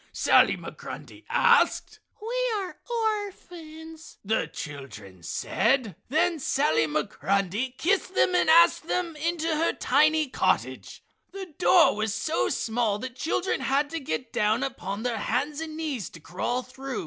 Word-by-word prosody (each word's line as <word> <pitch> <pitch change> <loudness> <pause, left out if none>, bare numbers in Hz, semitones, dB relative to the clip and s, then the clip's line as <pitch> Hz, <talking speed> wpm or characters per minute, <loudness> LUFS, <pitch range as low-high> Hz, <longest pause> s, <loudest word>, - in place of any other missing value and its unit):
Sally - - +4
Migrundy - - -10
asked. 475 0 +3 0.2
"We - - -1
are 380 -3 -5
orphans," 350 -8 -5
the 220 +2 0
children 135 - -9
said. 220 - 0
Then 330 +3 +1
Sally 155 - +1
Migrundy 195 - -1
kissed 375 +1 0
them 365 - +3
and 360 - +2
asked 335 0 +5
them 345 -3 -2
into 325 +1 -2
her 330 +2 +1
tiny 305 +3 +2
cottage. - - -1 0.3
The 380 -4 -8
door 360 - +5
was 215 0 -2
so 310 +9 0
small 225 -2 0
the 255 +5 -5
children 325 +9 -2
had 285 +2 0
to 330 - -3
get 230 - -4
down 210 0 +1
upon 220 -5 -4
their 240 -3 -1
hands 285 +8 -2
and 315 -1 -6
knees 290 - -3
to 170 - -13
crawl 215 +10 -3
through. 265 +1 -6
285 Hz, 140 wpm, -26 LUFS, 220-335 Hz, 0.3 s, asked